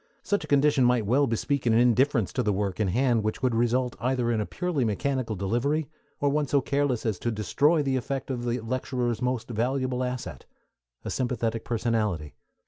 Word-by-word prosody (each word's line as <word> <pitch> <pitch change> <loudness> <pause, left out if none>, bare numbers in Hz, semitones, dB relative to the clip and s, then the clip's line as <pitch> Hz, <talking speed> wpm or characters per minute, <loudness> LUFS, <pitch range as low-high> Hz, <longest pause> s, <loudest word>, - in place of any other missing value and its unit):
Such 205 - 0
a - - -8
condition 145 -1 +3
might 125 -3 +3
well 135 +7 +3
bespeak 125 +3 -1
an 115 - +4
indifference 120 -1 +3
to 130 - 0
the 105 -4 +1
work 100 -1 -2
in 105 - +2
hand 120 +3 +2
which 110 +4 -3
would 125 -2 +2
result 120 +2 +1
either 125 -1 0
in 110 -2 +1
a 105 - -3
purely 175 -7 -1
mechanical 115 +1 -1
delivery, 125 - -1 0.3
or 145 -2 +2
one 145 0 0
so 140 - +3
careless 140 -3 0
as 110 -4 -1
to 120 - -1
destroy 140 - +2
the 135 -2 0
effect 135 +2 -3
of 120 -2 -3
the 120 +1 -1
lecturer's 125 0 -2
most 125 -1 -2
valuable 130 +2 -1
asset 125 -1 -5 0.6
a - - -3
sympathetic 120 -3 -1
personality. 110 -10 -1
125 Hz, 190 wpm, -27 LUFS, 115-135 Hz, 0.6 s, an